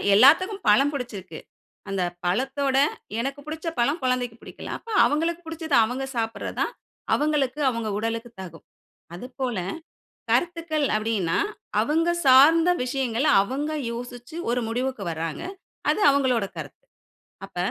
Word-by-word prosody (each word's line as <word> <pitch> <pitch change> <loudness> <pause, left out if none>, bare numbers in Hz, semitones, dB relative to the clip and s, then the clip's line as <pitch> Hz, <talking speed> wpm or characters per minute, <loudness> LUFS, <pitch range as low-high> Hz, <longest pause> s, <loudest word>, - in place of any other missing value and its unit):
எல்லாத்துக்கும் 370 - +5
பழம் 275 +8 +5
புடிச்சுருக்கு. 200 - -6 0.5
அந்த 190 -2 -1 0.2
பழத்தோட, 270 +8 0 0.4
எனக்கு 275 +4 -3
புடிச்ச 315 +2 -6
பழம் 285 +8 +2
குழந்தைக்கு 250 -2 0
பிடிக்கல. - - -10
அப்ப 460 - -15
அவங்களுக்கு 330 +3 +1
புடிச்சது 320 -2 -2
அவங்க 255 +4 -2
சாப்பிறது 225 -1 -3
தான் - - 0 0.4
அவங்களுக்கு 295 -2 +1
அவங்க 230 -3 -1
உடலுக்கு 230 +2 -3
தகும். 165 -3 -10 0.5
அதுபோல 250 +1 -4 0.7
கருத்துக்கள் 335 -4 +1
அப்டீன்னா 215 -6 0 0.4
அவங்க 330 +3 +1 0.2
சார்ந்த 305 +6 +7
விஷயங்கள், 255 0 -1 0.2
அவங்க 280 +9 -3 0.2
யோசிச்சு 245 +4 -8 0.2
ஒரு 245 - 0
முடிவுக்கு 250 -1 -2
வர்றாங்க. 165 - -4 0.5
அது - - +2
அவங்களோட 260 -6 +2
கருத்து. - - -8 0.6
அப்ப - - -15
260 Hz, 120 wpm, -25 LUFS, 230-300 Hz, 0.7 s, சார்ந்த